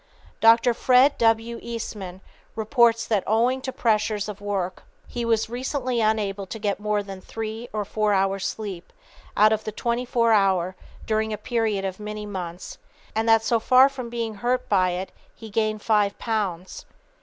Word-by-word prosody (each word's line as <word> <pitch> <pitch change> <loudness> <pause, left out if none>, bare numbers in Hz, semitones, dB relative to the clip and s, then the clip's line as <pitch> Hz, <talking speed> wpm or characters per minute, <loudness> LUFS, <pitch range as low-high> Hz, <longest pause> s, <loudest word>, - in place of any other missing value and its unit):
Dr. 230 +2 +5
Fred 255 +4 +4
W. 225 +1 +2
Eastman 205 -5 -6 0.3
reports 230 0 +3
that 210 -4 0
owing 240 +5 +2
to 260 - -4
pressure 220 -3 +1
of 205 -1 -7
work 195 -3 -3 0.3
he 240 - -4
was 225 -1 +1
recently 250 0 -2
unable 205 -3 0
to 185 - -6
get 205 -2 -2
more 210 0 -1
than 195 -1 -9
three 225 +3 -6
or 210 -1 -2
four 210 +1 0
hours' 195 0 +1
sleep 195 -5 -6 0.5
out 215 +1 +6
of 215 - -2
the 215 - -4
twenty 235 +3 -2
four 195 -7 +2 0.3
during 220 0 0
a 215 - -2
period 215 -3 -1
of 190 0 -4
many 210 0 -6
months, 180 -3 -7 0.3
and 225 +1 0
that 225 0 +5
so 230 +1 +2
far 255 +4 +6
from 255 -3 -7
being 230 -2 -3
hurt 245 +5 -1
by 185 -3 +3
it 180 +2 -4 0.2
he 220 -2 -11
gained 215 0 -1
five 210 -2 +2
pounds. 195 -6 -3
215 Hz, 165 wpm, -24 LUFS, 200-230 Hz, 0.5 s, out